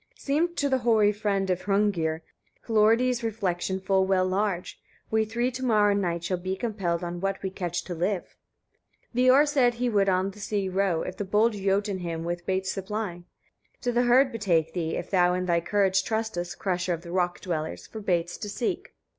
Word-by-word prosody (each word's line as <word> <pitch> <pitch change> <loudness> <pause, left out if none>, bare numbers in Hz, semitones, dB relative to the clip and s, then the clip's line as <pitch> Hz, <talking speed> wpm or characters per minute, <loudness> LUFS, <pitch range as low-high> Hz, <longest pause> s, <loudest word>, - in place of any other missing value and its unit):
16. - - -27
Seemed 330 +5 +1
to 285 - +1
the 265 -2 +1
hoary 220 -3 +4
friend 200 -2 -1
of 180 - -1
Hrungnir 190 -6 +1 0.5
Hlorridi's 230 +3 +3
refection 190 -4 -1
full 190 0 +2
well 185 -1 +3
large: 185 -1 -2 0.3
"We 220 0 +2
three 240 +3 -1
to 260 +1 -6
morrow 210 -4 +4
night 175 -4 -1
shall 180 0 -1
be 185 +1 -3
compelled 190 -6 -2
on 175 0 -4
what 195 0 -2
we 190 - -2
catch 175 -2 -3
to 180 - -5
live." 180 +3 -2 0.8
17. - - -20
Veor 280 +4 +6
said 265 -5 +3
he 245 +1 0
would 200 -3 +2
on 185 +1 +1
the 210 - -15
sea 205 -2 -2
row, 185 -3 +1
if 185 - -6
the - - -2
bold 210 +4 +2
Jotun 200 0 0
him 165 -2 -4
would 175 +1 -2
with 175 - -28
baits 190 0 0
supply: 195 -3 -4 0.6
"To 245 - 0
the 240 0 +2
herd 255 +2 +4
betake 170 -8 0
thee, 165 -3 -2
(if 175 - -5
thou 180 -2 +3
in 185 0 -1
thy 170 -1 +2
courage 190 0 +2
trustest, 220 -6 -3
crusher 180 -2 -1
of 165 - -12
the 170 - -8
rock 180 -1 0
dwellers!) 155 - -4
for 220 - -8
baits 175 -4 -1
to 210 - -5
seek. 230 +4 -3
195 Hz, 205 wpm, -27 LUFS, 175-220 Hz, 0.8 s, Veor